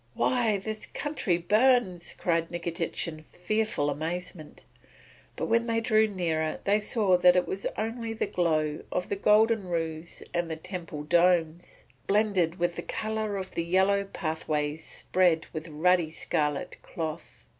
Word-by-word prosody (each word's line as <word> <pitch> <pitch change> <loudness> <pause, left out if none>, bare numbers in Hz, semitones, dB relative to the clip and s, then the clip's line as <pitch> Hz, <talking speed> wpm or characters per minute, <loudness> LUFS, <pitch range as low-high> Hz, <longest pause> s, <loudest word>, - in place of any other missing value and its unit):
"Why, 230 -5 +2
the 215 +2 -6
country 290 - 0
burns!" 210 -1 +2
cried 165 -1 0
Nikitich 170 0 -3
in 155 -2 -7
fearful 180 -2 -1
amazement. 160 +1 -5 0.7
But - - -2
when 230 +1 +2
they 230 0 +1
drew 220 -1 +3
nearer 165 -6 -1
they 205 +1 +3
saw 205 -4 +2
that 180 0 +6
it 180 - +2
was 195 - -2
only 225 +1 -3
the 225 - -1
glow 155 -5 0
of 180 - -2
the - - 0
golden 210 0 +3
roofs 165 -1 -4
and 175 -1 -1
the 160 - -2
temple 165 -3 -7
domes, 170 0 +1 0.2
blended 195 -5 +2
with 175 -1 -1
the - - -2
colour 215 +1 -3
of 190 -1 -6
the 170 - -1
yellow 190 +3 +2
pathways 155 -3 -3
spread 175 -2 +1
with 155 0 -5
ruddy 170 +2 +2
scarlet 155 0 -2
cloth. 160 -1 -6
180 Hz, 145 wpm, -28 LUFS, 165-210 Hz, 0.7 s, that